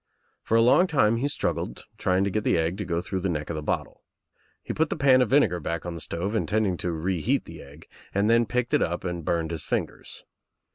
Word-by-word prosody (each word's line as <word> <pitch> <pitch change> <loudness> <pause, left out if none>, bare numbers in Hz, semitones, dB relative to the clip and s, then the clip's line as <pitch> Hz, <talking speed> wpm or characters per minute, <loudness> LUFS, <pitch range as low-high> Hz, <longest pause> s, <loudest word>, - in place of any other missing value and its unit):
For 115 - +1
a 115 - +5
long 155 +10 +5
time 115 -9 +3
he 135 +5 0
struggled, 135 - -3
trying 95 +1 +2
to 100 - 0
get 110 +2 -1
the - - +2
egg 80 +2 0
to 105 - -3
go 85 -1 -1
through 95 +1 -3
the 95 +1 -1
neck 75 -1 -3
of - - -4
the 75 - -3
bottle. 75 - -3 0.6
He - - -4
put 160 0 +1
the - - -1
pan 130 -2 +5
of 125 - +2
vinegar 110 -11 +3
back 85 +1 -4
on 85 - -4
the 85 - -7
stove, 90 +7 -3
intending 110 -3 +1
to 90 - -2
reheat 85 0 -1
the - - -10
egg, 70 +3 -14 0.2
then 115 +4 +3
picked 125 -1 -1
it - - +4
up 85 +1 -1
and 90 -2 -4
burned 85 0 -1
his 80 -3 -3
fingers. - - -4
95 Hz, 235 wpm, -26 LUFS, 85-115 Hz, 0.6 s, a